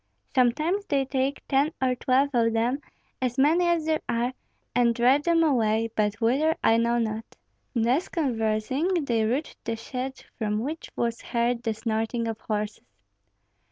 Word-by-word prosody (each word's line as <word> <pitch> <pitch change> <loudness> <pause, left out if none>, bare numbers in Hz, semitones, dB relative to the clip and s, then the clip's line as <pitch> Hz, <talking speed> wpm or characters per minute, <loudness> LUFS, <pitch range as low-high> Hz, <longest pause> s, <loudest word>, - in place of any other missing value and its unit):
"Sometimes 305 +10 +2
they 275 -2 +1
take 270 +1 -2
ten 280 +3 +2
or 260 -1 +2
twelve 260 +3 +2
of 230 -2 +2
them, 235 +5 +1 0.4
as 250 0 -1
many 320 +6 +4
as 340 -2 +1
there 315 -1 +1
are, 240 +2 0 0.4
and 235 -1 +3
drive 255 +5 +4
them 335 -1 +4
away, 225 -6 +2
but 210 -1 +1
whither 275 +8 +2
I 225 - +5
know 235 +1 +2
not." 220 -1 -1 0.5
Thus 245 +9 +1
conversing, 265 - 0
they 230 -4 +1
reached 260 +8 -2
the 230 - -2
shed, 255 +3 -5 0.2
from 210 -2 0
which 305 +6 -5
was 235 -1 -1
heard 235 0 0
the 225 -2 -2
snorting 225 +1 -1
of 225 -1 -4
horses. 210 0 -3
245 Hz, 155 wpm, -26 LUFS, 225-280 Hz, 0.5 s, I